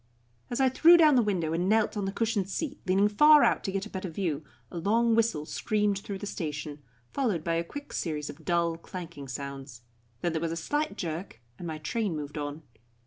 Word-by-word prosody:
As 240 - -2
I 265 - +5
threw 330 +7 +7
down 310 -3 +6
the 250 - +5
window 180 -7 0
and 175 +3 0
knelt 220 0 +2
on 205 -2 -2
the 195 - -1
cushioned 215 -3 -1
seat, 295 - -3
leaning 195 +2 +4
far 300 +8 +7
out - - +2
to 195 - -1
get 195 +1 -2
a - - -9
better 190 -1 -4
view, 160 -3 -2 0.3
a 170 - -4
long 230 +6 +2
whistle 225 -10 +1
screamed 210 +1 0
through 200 0 -6
the 200 - -6
station, 150 -5 -5 0.3
followed 215 - 0
by 165 - 0
a 165 0 +1
quick 285 +12 -9
series 150 -3 -2
of - - -9
dull, 170 -2 +1
clanking 170 -5 -8
sounds; 135 -1 -7 0.4
then 175 - 0
there 160 - -1
was 165 -1 -1
a - - -2
slight 290 - -2
jerk, 165 - -5 0.2
and 175 - -6
my 160 -1 -4
train 195 +4 -2
moved 150 0 -5
on. 145 +2 -5
185 Hz, 215 wpm, -28 LUFS, 160-220 Hz, 0.4 s, threw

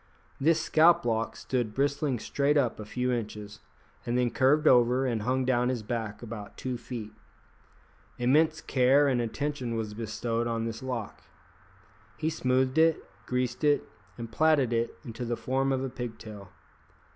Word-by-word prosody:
This 160 +4 +3
scalplock 155 -11 +3
stood 120 -5 -2
bristling 140 -1 0
straight 140 +6 0
up 125 -6 +1
a 105 - -6
few 125 +3 -1
inches, 105 -3 -5 0.4
and 120 +1 -1
then 125 -1 +1
curved 150 +4 +3
over 125 +1 +4
and 115 -4 -1
hung 130 +4 0
down 125 -1 +2
his 125 -4 -2
back 110 -1 -4
about 110 -3 -8
two 130 -1 -3
feet. 115 -3 -7 1.1
Immense 155 +6 +2
care 135 +3 +3
and 125 -3 +1
attention 125 0 -3
was 110 -2 -3
bestowed 115 +1 -2
on 115 -1 -2
this 115 0 -5
lock. 125 -5 -5 1.0
He 160 - -1
smoothed 130 -1 +1
it, 160 0 +3 0.2
greased 125 +2 -2
it, 145 -2 +2 0.3
and 115 -1 -7
plaited 150 -6 +3
it 115 0 -1
into 120 0 -6
the 120 -1 -2
form 135 +1 0
of 130 0 0
a 135 - -2
pigtail. 110 -5 -8
125 Hz, 155 wpm, -28 LUFS, 115-135 Hz, 1.1 s, over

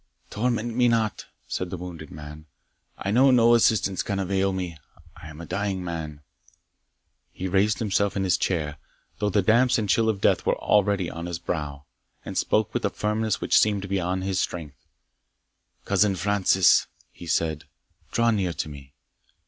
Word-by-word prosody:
"Torment 120 +1 -1
me 125 0 +4
not," 115 -3 0 0.2
said 90 - -3
the 90 - -5
wounded 85 -3 -8
man 75 +1 -10 0.5
"I 100 - -3
know 130 +5 +5
no 120 -2 +5
assistance 110 -4 +3
can 100 - -3
avail 95 0 0
me 90 -4 -5 0.4
I 80 -1 -11
am 75 0 -11
a 85 - -7
dying 95 0 -2
man." 80 -4 -5 1.1
He 95 - -5
raised 100 +3 +2
himself 100 -3 0
in 95 - 0
his 90 -2 +2
chair, 80 -6 -2 0.4
though 105 - +1
the 100 -1 +2
damps 120 +5 +4
and 110 -2 -1
chill 110 +3 +2
of 105 -3 -1
death - - +2
were - - +1
already 100 -3 +2
on 85 +1 -6
his 85 -1 -4
brow, 75 -4 -5 0.4
and - - -6
spoke 110 -1 +1
with - - -2
a - - +2
firmness 105 0 -1
which - - +4
seemed 100 -2 +1
beyond 95 -1 -1
his 95 -1 -1
strength. 75 -5 -5 1.0
"Cousin 100 0 +2
Francis," 95 -1 +3 0.2
he 85 - -12
said, 80 -2 -1 0.5
"draw 115 0 +2
near 95 -5 0
to 75 - -4
me." 70 -2 -12
95 Hz, 170 wpm, -25 LUFS, 85-105 Hz, 1.1 s, know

